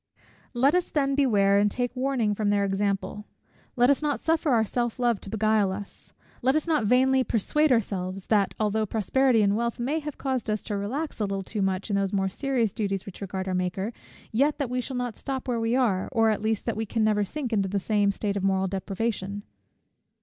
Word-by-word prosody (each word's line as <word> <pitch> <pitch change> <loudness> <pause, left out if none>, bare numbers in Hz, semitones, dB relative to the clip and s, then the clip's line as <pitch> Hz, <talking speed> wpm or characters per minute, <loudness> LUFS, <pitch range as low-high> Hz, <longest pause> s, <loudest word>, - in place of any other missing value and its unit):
Let 270 +5 +4
us 360 0 +1
then 275 -2 +1
beware, 205 -8 +3
and 205 0 +3
take 245 +3 -2
warning 255 -5 0
from 205 0 -1
their 200 -1 +2
example: 200 +1 -2 0.5
let 245 -1 +4
us 280 - +1
not 295 -2 0
suffer 320 -1 +1
our 230 -4 +3
self 240 +1 -2
love 240 -4 +1
to - - -8
beguile 215 -2 +2
us: 200 +1 -8 0.3
let 265 +3 +2
us 310 - +1
not 310 -9 +1
vainly 260 +2 +4
persuade 290 +7 +1
ourselves, 195 -5 -1
that 205 -3 +2
although 215 0 +1
prosperity 230 +3 +2
and 200 0 +2
wealth 235 +1 -1
may 280 +7 0
have 300 -2 -7
caused 260 -5 -2
us 215 -1 -1
to 205 - -3
relax 255 +11 -3
a 210 - +1
little 195 -1 -3
too 210 +2 -4
much, 190 +2 -1
in - - +1
those 195 0 -1
more 195 -1 +1
serious 240 -1 -1
duties 195 -3 -2
which 200 - -10
regard 190 -1 -4
our 185 - -1
Maker, 185 +4 -2 0.4
yet 280 +7 +2
that 275 -5 -2
we 250 0 0
shall 245 -2 -3
stop 265 +4 -5
where 240 -2 0
we 225 +1 +1
are; 215 -8 +1
or, 225 -3 +3
at 210 - -2
least, 220 -1 -1
that 230 - -1
we 220 0 -3
can 225 +2 0
never 210 -1 +2
sink 250 +3 -4
into 195 -3 +1
the 200 - -1
same 205 0 +2
state 200 0 -2
of 200 - -2
moral 190 0 +2
depravation. 195 +1 -3
220 Hz, 215 wpm, -26 LUFS, 200-255 Hz, 0.5 s, Let